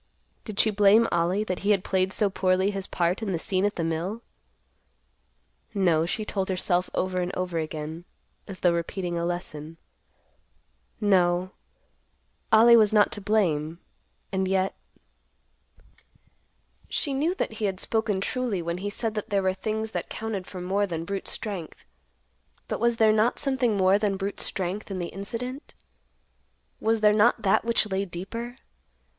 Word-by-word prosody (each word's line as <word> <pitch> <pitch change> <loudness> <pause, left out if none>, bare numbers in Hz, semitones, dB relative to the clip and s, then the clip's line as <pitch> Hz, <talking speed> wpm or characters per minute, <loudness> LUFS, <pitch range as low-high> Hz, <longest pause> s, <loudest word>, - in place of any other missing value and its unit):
Did 215 -3 -5
she 220 - +5
blame 210 +3 +5
Ollie 175 +4 +1
that 185 -4 -3
he 200 - -2
had 200 -3 +3
played 190 0 +1
so 210 +1 +2
poorly 190 +1 +2
his 195 -2 -4
part 175 +4 0
in 205 -4 -2
the - - 0
scene 190 +2 0
at 205 - 0
the 170 - -2
mill. 170 +8 -2 1.5
No, 170 -5 +3
she 215 +4 -2
told 195 -2 -2
herself 180 -1 +1
over 185 0 0
and 180 0 -2
over 180 -2 -2
again, 155 +1 -5 0.4
as 190 -2 -8
though 175 -1 +4
repeating 175 +1 -3
a 170 0 -1
lesson; 165 -2 -5 1.2
no, 185 -3 +2 1.0
Ollie 230 +2 +8
was 215 -3 +5
not 210 -1 +4
to 205 - -4
blame, 170 -7 +1 0.5
and 190 -1 0
yet— 190 0 +1 2.2
She 285 - -1
knew 310 +7 0
that 225 - -2
he 215 -1 -3
had 190 -2 -2
spoken 215 -4 0
truly 235 -5 -2
when 170 +1 -3
he 205 +2 -3
said 220 +2 -2
that 215 +1 -4
there 200 -2 +1
were 185 0 +2
things 220 +3 -3
that - - -4
counted 220 -4 -4
for 185 - -8
more 195 +3 0
than 165 -2 -4
brute 200 +1 -4
strength. 195 -7 -5 0.8
But - - -3
was 235 0 +2
there 220 -1 +5
not 220 +3 +2
something 255 -6 +1
more 190 +1 +4
than 205 -2 0
brute 195 +1 -4
strength 190 +3 -3
in 195 - -4
the 175 -1 -3
incident? 245 +8 -6 1.0
Was 225 0 +1
there 210 -1 +6
not 220 +1 +3
that 200 +2 +3
which 230 -1 +2
lay 190 +1 0
deeper? 230 +7 -6
195 Hz, 160 wpm, -26 LUFS, 180-215 Hz, 2.2 s, Ollie